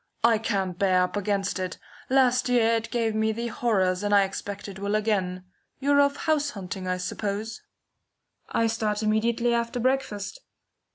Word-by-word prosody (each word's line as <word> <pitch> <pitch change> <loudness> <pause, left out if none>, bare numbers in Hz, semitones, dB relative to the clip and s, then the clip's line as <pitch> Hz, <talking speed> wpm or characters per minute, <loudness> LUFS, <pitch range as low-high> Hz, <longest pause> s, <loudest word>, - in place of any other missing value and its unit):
I 230 -2 +5
can't 195 -5 -2
bear 185 -2 +4
up 180 - -3
against 200 -1 -1
it. 185 -1 -3 0.3
Last 255 -1 +3
year 230 -2 +4
it 225 0 -1
gave 230 -3 0
me 220 0 +1
the 235 +2 -3
horrors, 190 -6 +1
and 205 0 +2
I 200 - +6
expect 200 +1 -5
it 195 -1 -8
will 200 +1 -1
again. 190 -4 0 0.3
You're 285 +1 +3
off 280 0 +2
house 300 -1 +1
hunting, 190 -5 -6
I 185 0 0
suppose?" 205 +4 -4 0.9
"I 230 - +1
start 220 -2 -1
immediately 230 +2 +1
after 235 +1 -1
breakfast." 255 - -1
215 Hz, 165 wpm, -26 LUFS, 195-235 Hz, 0.9 s, I